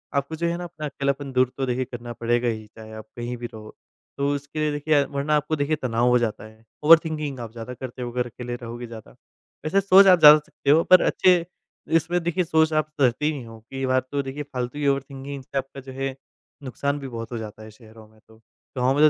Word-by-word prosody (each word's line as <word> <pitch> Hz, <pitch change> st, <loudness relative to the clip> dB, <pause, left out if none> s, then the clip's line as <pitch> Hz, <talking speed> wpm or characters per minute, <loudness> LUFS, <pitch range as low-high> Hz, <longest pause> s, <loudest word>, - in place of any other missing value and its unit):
आपको 140 Hz, +3 st, -1 dB
जो 170 Hz, +2 st, -1 dB
है 170 Hz, 0 st, -1 dB
ना 175 Hz, -, -6 dB
अपना 155 Hz, -3 st, -7 dB
अकेलापन 140 Hz, -1 st, -2 dB
दूर 130 Hz, 0 st, +3 dB
तो 135 Hz, -, 0 dB
देखिए 130 Hz, 0 st, -1 dB
करना 120 Hz, -1 st, -8 dB
पड़ेगा 120 Hz, +1 st, 0 dB
ही, 110 Hz, -2 st, -2 dB
चाहे 110 Hz, 0 st, -13 dB
आप 110 Hz, 0 st, -9 dB
कहीं 120 Hz, +1 st, -4 dB
भी 120 Hz, -, -6 dB
रहो, 110 Hz, -1 st, -11 dB, 0.4 s
तो 140 Hz, -, 0 dB
उसके 145 Hz, +2 st, -6 dB
लिए 155 Hz, -1 st, +1 dB
देखिए 145 Hz, +1 st, -1 dB
अ, -, -, -5 dB
वरना 140 Hz, +2 st, 0 dB
आपको 150 Hz, +1 st, 0 dB
देखिए 145 Hz, +1 st, 0 dB
तनाव 120 Hz, -1 st, +1 dB
हो 125 Hz, -, +5 dB
जाता 110 Hz, -3 st, -2 dB
है, 110 Hz, +1 st, -16 dB, 0.2 s
ओवरथिंकिंग 155 Hz, -3 st, +4 dB
आप 115 Hz, -2 st, -7 dB
ज़्यादा 115 Hz, +2 st, -7 dB
करते 125 Hz, 0 st, -8 dB
हो, 120 Hz, -1 st, -4 dB
अगर 125 Hz, 0 st, -1 dB
अकेले 120 Hz, +1 st, -6 dB
रहोगे 120 Hz, 0 st, -7 dB
ज़्यादा। 115 Hz, -2 st, -11 dB, 0.5 s
वैसे 195 Hz, +6 st, +2 dB
सोच 195 Hz, +1 st, +7 dB
आप 180 Hz, -2 st, +7 dB
जा 150 Hz, -1 st, +11 dB
सकते 150 Hz, -1 st, -6 dB
हो 160 Hz, +3 st, +6 dB
पर 185 Hz, -1 st, +6 dB
अच्छे 180 Hz, -2 st, +3 dB, 0.5 s
इसमें 175 Hz, +2 st, 0 dB
देखिए 175 Hz, +2 st, 0 dB
सोच 160 Hz, -1 st, +2 dB
आप 155 Hz, 0 st, +1 dB
करते 130 Hz, +2 st, +2 dB
ही 155 Hz, -, +3 dB
नहीं 135 Hz, -5 st, -7 dB
हो 115 Hz, 0 st, -12 dB
कि 135 Hz, -, -8 dB
ये 135 Hz, -, -1 dB
बात 130 Hz, 0 st, +1 dB
तो 145 Hz, -, 0 dB
देखिए 140 Hz, +2 st, -5 dB
फालतू 130 Hz, 0 st, -5 dB
की 145 Hz, -, 0 dB
ओवरथिंकिंग 135 Hz, 0 st, -3 dB
से 140 Hz, -, -6 dB
आपका 135 Hz, 0 st, -4 dB
जो 130 Hz, -, -10 dB
है, 135 Hz, 0 st, -3 dB, 0.5 s
नुकसान 140 Hz, +2 st, -2 dB
भी 135 Hz, -, -6 dB
बहुत 115 Hz, -1 st, -7 dB
हो 120 Hz, -, -3 dB
जाता 110 Hz, 0 st, -8 dB
है 110 Hz, -, -11 dB
शहरों 110 Hz, 0 st, -16 dB
में 110 Hz, 0 st, -24 dB
तो। 110 Hz, 0 st, -19 dB, 0.4 s
गाँव 130 Hz, +2 st, +2 dB
में 155 Hz, -, +7 dB
135 Hz, 240 wpm, -24 LUFS, 120-150 Hz, 0.5 s, जा